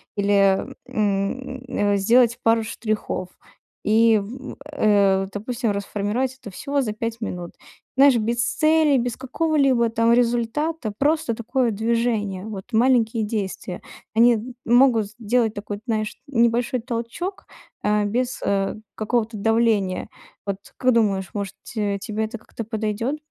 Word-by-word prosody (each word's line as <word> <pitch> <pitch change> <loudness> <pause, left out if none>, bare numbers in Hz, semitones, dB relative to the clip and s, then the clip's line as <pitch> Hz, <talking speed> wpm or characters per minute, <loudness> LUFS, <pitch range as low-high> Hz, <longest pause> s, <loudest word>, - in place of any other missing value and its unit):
или, 200 -1 +3 0.2
м, 210 +6 -1
э, 205 -5 +1
сделать 230 +3 +4
пару 225 0 +3
штрихов 215 -4 -3 0.6
и, 225 +1 +5
в, 255 +6 -8 0.2
э, 200 -7 +3
допустим, 230 +2 -2
расформировать 210 +6 -2
это 220 -6 -9
всего 280 +9 -2
за 215 -4 -2
5 230 +1 -4
минут. 180 -6 -5 0.5
Знаешь, 275 -1 +7
без 235 +2 0
цели, 310 -1 +3
без 245 -1 -2
какого-либо 265 -3 +2
там 230 +1 +3
результата. 240 +2 0
Просто 295 -3 +1
такое 235 +2 0
движение. 220 -3 -1
Вот 205 -3 -6
маленькие 230 -1 +3
действия 195 -4 -4 0.3
они, 235 +1 +6
м, 240 +3 -6
могут 240 -3 +4
сделать 230 0 +1
такой, 205 0 -6
знаешь, 215 -1 -1
небольшой 235 -1 +2
толчок, 240 - -4 0.4
э, 210 0 +2
без, 245 +4 -1
э, 195 -1 0 0.2
какого-то 225 +1 -1
давления. 220 -3 +1 0.4
Вот 200 -1 -2 0.2
как 255 -1 +3
думаешь, 195 -5 +1
может, 200 -2 -4
ть - - -10 0.3
тебе 215 +1 -3
это 230 +2 -6
как-то 230 - -8
подойдёт? 220 +4 -2
225 Hz, 130 wpm, -23 LUFS, 205-245 Hz, 0.6 s, Знаешь